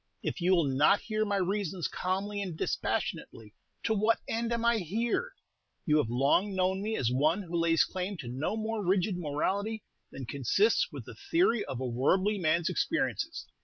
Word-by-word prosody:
If - - -3
you 185 +2 +4
will 170 - +3
not 145 +8 +3
hear 215 -1 -1
my 205 -1 0
reasons 190 -2 -1
calmly 200 +3 -2
and 180 -5 -5
dispassionately, 110 -7 -3 0.3
to 220 - +1
what 215 +2 +2
end 230 +1 -1
am 235 0 -1
I 235 -1 +3
here? 230 - -1 0.5
You 155 -4 +3
have 145 -7 +1
long 140 - +2
known 190 +1 +1
me 220 +2 -2
as 120 -2 0
one 155 +10 +2
who 175 -1 -6
lays 165 -1 +3
claim 185 +1 -4
to 140 -6 -7
no 135 - -2
more 220 -1 -2
rigid 185 +1 +1
morality 195 +7 -2 0.3
than 135 - -7
consists 140 - +2
with - - -8
the - - -9 0.2
theory 330 - +3
of 125 - -5
a 130 - -2
worldly 185 - +1
man's 170 0 +1
experiences. 330 0 -1
190 Hz, 180 wpm, -30 LUFS, 155-215 Hz, 0.5 s, you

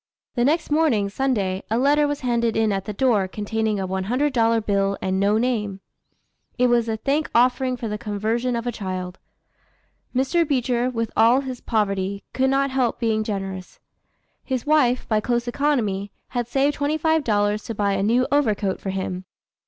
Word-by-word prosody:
The 240 - +1
next 305 +4 +1
morning, 285 -11 +2
Sunday, 200 -6 -1
a 225 - +1
letter 290 +3 +3
was 290 0 -3
handed 235 -3 0
in 220 -1 +2
at 195 -1 -2
the - - -4
door, 210 -3 +2
containing 215 +1 -2
a 190 - -2
$100 230 +3 +1
bill, 200 -1 +1
and 190 0 -1
no 205 +2 +3
name. 215 -5 -1 0.8
It 250 0 +3
was 235 -1 +2
a 220 - -1
thank 280 +7 0
offering 255 +1 +3
for 235 - -4
the 210 0 -4
conversion 225 +4 -1
of 235 0 -3
a 245 - -1
child. 185 -3 -5 1.0
Mr. 270 +7 +2
Beecher, 255 -4 0
with 230 -3 -3
all 235 +4 +5
his 260 -3 -6
poverty, 200 -3 -1
could 265 0 +2
not 275 0 +1
help 255 -3 0
being 220 -2 +1
generous. 195 -3 -5 0.6
His 260 -3 -3
wife, 280 -5 +2
by 215 -2 +2
close 240 +2 -1
economy, 235 -8 0 0.2
had 245 -2 -2
saved 275 +3 +1
twenty 290 +2 -1
five 320 0 +1
dollars 205 -2 +1
to 230 - -5
buy 200 -1 +1
a 195 - 0
new 235 +5 +2
overcoat 215 -9 +1
for 195 - -4
him. 185 -1 -4
230 Hz, 175 wpm, -23 LUFS, 205-260 Hz, 1.0 s, all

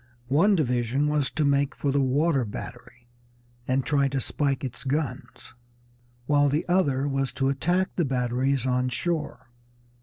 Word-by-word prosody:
One 195 +8 +4
division 125 -2 0
was 150 -2 +1
to 155 - -1
make 140 0 +1
for 140 - -1
the 140 +1 +2
water 140 +2 +2
battery 120 +2 -9 0.6
and 130 +1 0
try 140 -2 +2
to 135 0 -2
spike 140 0 -1
its 125 -1 -6
guns, 135 -2 -4 0.7
while 145 +1 +3
the 150 +3 -1
other 145 -7 +1
was 135 -1 -1
to 135 0 0
attack 175 +7 0
the 175 - +1
batteries 130 0 0
on 125 0 +1
shore. 155 -4 -3
140 Hz, 150 wpm, -26 LUFS, 130-150 Hz, 0.7 s, One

